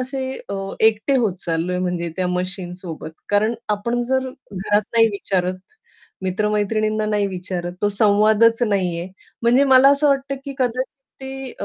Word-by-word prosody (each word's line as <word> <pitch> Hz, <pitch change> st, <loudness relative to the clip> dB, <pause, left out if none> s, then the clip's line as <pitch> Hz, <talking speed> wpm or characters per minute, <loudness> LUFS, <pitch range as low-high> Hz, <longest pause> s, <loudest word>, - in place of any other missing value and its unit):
असे 260 Hz, +1 st, -3 dB, 0.2 s
अ, 200 Hz, -, -3 dB, 0.3 s
एकटे 220 Hz, +5 st, +3 dB
होत 220 Hz, -8 st, +1 dB
चाललोय 170 Hz, +2 st, -1 dB
म्हणजे 180 Hz, -2 st, -2 dB
त्या 185 Hz, -1 st, 0 dB
मशीनसोबत. 180 Hz, -2 st, -4 dB, 0.2 s
कारण 215 Hz, +3 st, +2 dB, 0.2 s
आपण 235 Hz, +4 st, -2 dB
जर 260 Hz, 0 st, +1 dB
घरात 210 Hz, -5 st, -2 dB
नाही 230 Hz, -1 st, +5 dB
विचारत, 185 Hz, -3 st, -1 dB, 0.7 s
मित्र-मैत्रिणींना 210 Hz, +2 st, 0 dB
नाही 210 Hz, -1 st, +1 dB
विचारत, 180 Hz, -2 st, -4 dB
तो 205 Hz, -, +3 dB
संवादच 215 Hz, +3 st, +4 dB
नाहीये. 180 Hz, -5 st, 0 dB, 0.4 s
म्हणजे 245 Hz, +4 st, +4 dB
मला 265 Hz, 0 st, +7 dB
असं 285 Hz, +1 st, +3 dB
वाटतं 275 Hz, 0 st, +1 dB
की 280 Hz, -, -5 dB
कदाचित 255 Hz, +1 st, -1 dB, 0.3 s
ते 265 Hz, -1 st, -7 dB
अ, -, -, -2 dB
210 Hz, 145 wpm, -21 LUFS, 185-250 Hz, 0.7 s, मला